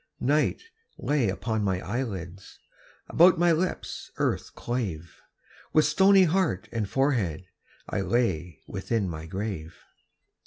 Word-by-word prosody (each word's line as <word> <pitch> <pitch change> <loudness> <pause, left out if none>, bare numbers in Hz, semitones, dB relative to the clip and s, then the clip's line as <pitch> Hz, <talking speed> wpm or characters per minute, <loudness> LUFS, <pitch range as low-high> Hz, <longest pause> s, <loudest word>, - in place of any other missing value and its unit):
Night 145 - +1 0.3
lay 140 -7 +1
upon 110 +2 -2
my 95 -2 0
eyelids, 95 -5 -5 0.5
About 175 +1 +6
my 175 0 +4
lips 175 +3 -2
earth - - -1
clave; 95 -10 -4 0.5
With 155 - +5
stony 190 +5 +5
heart 175 - +1
and 110 -4 -2
forehead 110 - 0 0.4
I 100 - -2
lay 90 - -1
within 100 +1 -2
my 80 -2 -6
grave. 95 -3 -5
110 Hz, 115 wpm, -27 LUFS, 90-150 Hz, 0.5 s, About